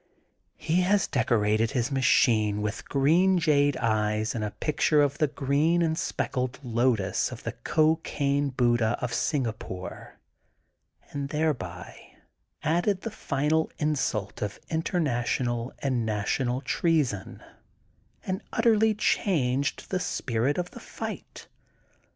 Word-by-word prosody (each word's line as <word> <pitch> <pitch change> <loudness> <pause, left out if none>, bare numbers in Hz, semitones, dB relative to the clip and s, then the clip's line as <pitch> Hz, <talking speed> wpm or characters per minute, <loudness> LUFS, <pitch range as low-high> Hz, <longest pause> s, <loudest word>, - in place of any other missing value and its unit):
He 165 +3 +1
has 195 +2 +3
decorated 110 -2 +1
his 125 +2 -1
machine 110 -5 +3
with 105 +1 -4
green 170 +7 +3
jade 145 -4 +3
eyes 110 -1 0
and 105 -2 -4
pictures 150 -1 +3
of 140 0 -4
the 155 - +3
green 145 +5 +1
and 160 -1 +1
speckled 130 -5 -2
lotus 120 -5 +1
of - - -9
the - - -3
Cocaine 145 -3 +1
Buddha 120 -3 +2
of 125 -1 -3
Singapore 110 - -3 0.9
and 140 -1 -4
thereby 125 - -3 0.5
added 175 +5 +1
the 230 - -5
final 155 -4 0
insult 130 -9 -1
of 105 -1 -3
interna 160 -6 0
tional 120 0 -1
alid 135 -2 +1
national 110 +4 -1
treason*' 140 - 0 0.8
and 190 +2 -2
utterly 220 -1 +3
changed 140 -10 0
the 185 - +1
spirit 135 -6 -1
of 175 0 -3
the - - -10
fight. - - -7
140 Hz, 115 wpm, -27 LUFS, 115-160 Hz, 0.9 s, has